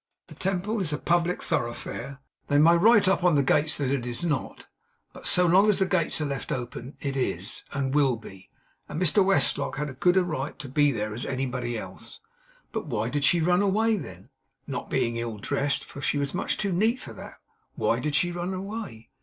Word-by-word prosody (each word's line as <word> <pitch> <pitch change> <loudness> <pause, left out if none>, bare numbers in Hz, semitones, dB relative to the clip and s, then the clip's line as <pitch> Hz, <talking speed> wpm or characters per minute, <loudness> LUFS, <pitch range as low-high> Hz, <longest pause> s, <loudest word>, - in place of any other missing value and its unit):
The - - -10
Temple 195 +3 -1
is 175 -6 +1
a 150 - -1
public 175 +2 0
thoroughfare; 135 +3 -3 0.3
they 145 - +2
may 165 +3 +6
write 205 +3 +5
up 190 -1 +2
on 175 -3 +4
the 140 - +3
gates 150 +3 +2
that 135 -2 -1
it 140 -3 0
is 120 +6 -4
not, 150 -5 -2 0.5
but - - -6
so 180 - +4
long 190 +5 +5
as 210 - +3
the 190 - +2
gates 185 -5 0
are 155 - -1
left 140 -3 -4
open 125 +1 -5
it 140 -2 -3
is, 100 -8 -2
and 135 -1 -2
will 140 -4 +3
be; 95 -4 -13 0.4
and 155 - -4
Mr 185 +2 +4
Westlock 195 +1 +2
had 150 0 -3
as 130 - -14
good 180 +1 +4
a 185 - +5
right 150 -5 -4
to 145 - -8
be 145 +2 +3
there 105 -3 -3
as 120 - -4
anybody 130 -2 -2
else. - - -9 0.5
But 220 -7 -4
why 115 -4 -1
did 145 +2 -1
she 170 +3 +4
run 175 +3 +3
away, 215 +3 +2
then? 170 -9 -8 0.4
Not - - -5
being 115 0 0
ill 115 -2 -4
dressed, 140 +6 -1
for 140 - -10
she 145 - 0
was 140 -1 -2
much 180 - -1
too 200 -2 -1
neat 220 +8 +2
for - - -9
that, - - -10 0.4
why - - +1
did 150 -1 -2
she 175 +3 +2
run 175 +2 -3
away? 190 - -7
150 Hz, 215 wpm, -26 LUFS, 130-180 Hz, 0.5 s, may